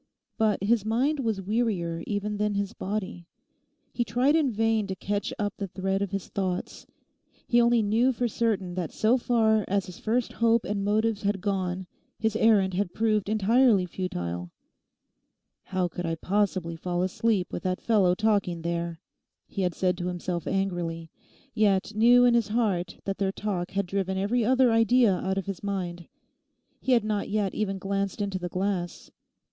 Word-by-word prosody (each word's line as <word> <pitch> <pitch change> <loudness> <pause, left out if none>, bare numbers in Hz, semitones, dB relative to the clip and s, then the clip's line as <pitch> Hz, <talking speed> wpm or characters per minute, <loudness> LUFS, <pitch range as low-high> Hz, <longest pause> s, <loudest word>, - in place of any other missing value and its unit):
But 215 -3 +1
his 220 0 +2
mind 255 +8 +1
was 220 -6 -1
wearier 190 -6 -1
even 205 0 -2
than 210 0 0
his 200 +1 -2
body. 190 -5 -4 0.7
He 240 - 0
tried 245 +7 +2
in 310 -4 +3
vain 225 -2 +1
to 190 - -3
catch 205 +2 -2
up 205 -1 -1
the 200 - -3
thread 195 +1 -2
of 200 - -1
his 195 -1 -4
thoughts. 185 -2 -3 0.6
He 240 0 +4
only 235 -1 +4
knew 225 +5 +3
for 245 0 -1
certain 210 -5 -1
that 175 -4 -3
so 220 +3 +2
far 220 -3 +2
as 195 0 0
his 180 - -10
first 230 +2 -1
hope 230 0 +2
and 200 -1 -2
motives 215 +1 +1
had 200 0 0
gone 190 -2 -2 0.3
his 220 -1 0
errand 210 -4 +4
had 180 -1 -2
proved 215 -2 +1
entirely 220 -1 +4
futile. 90 - -4 1.2
'How 185 -2 -1
could 175 0 -5
I 165 - -1
possibly 185 -2 -1
fall 175 +1 -2
asleep 190 0 0
with - - -3
that 185 0 -1
fellow 195 -6 +3
talking 200 -5 0
there?' 170 -1 -3 0.5
he 195 - -5
had 180 -3 0
said 180 -1 0
to 175 - -2
himself 175 -1 -3
angrily; 175 -4 -2 0.4
yet 210 -2 +2
knew 240 +3 +6
in 245 - +5
his 235 -3 +2
heart 210 -5 -1
that 195 -1 -3
their 195 -1 +1
talk 195 -3 -3
had 200 0 0
driven 190 0 -2
every 215 +5 +1
other 255 +1 +4
idea 225 -1 +4
out 190 +1 -2
of 195 - -2
his 195 -2 -5
mind. 180 -4 -4 0.7
He 260 - +1
had 235 -3 +4
not 210 -1 -2
yet 205 -2 0
even 195 -2 -2
glanced 195 +1 -2
into 200 -2 -2
the 180 0 -4
glass. 185 -1 -3
200 Hz, 175 wpm, -27 LUFS, 185-220 Hz, 1.2 s, knew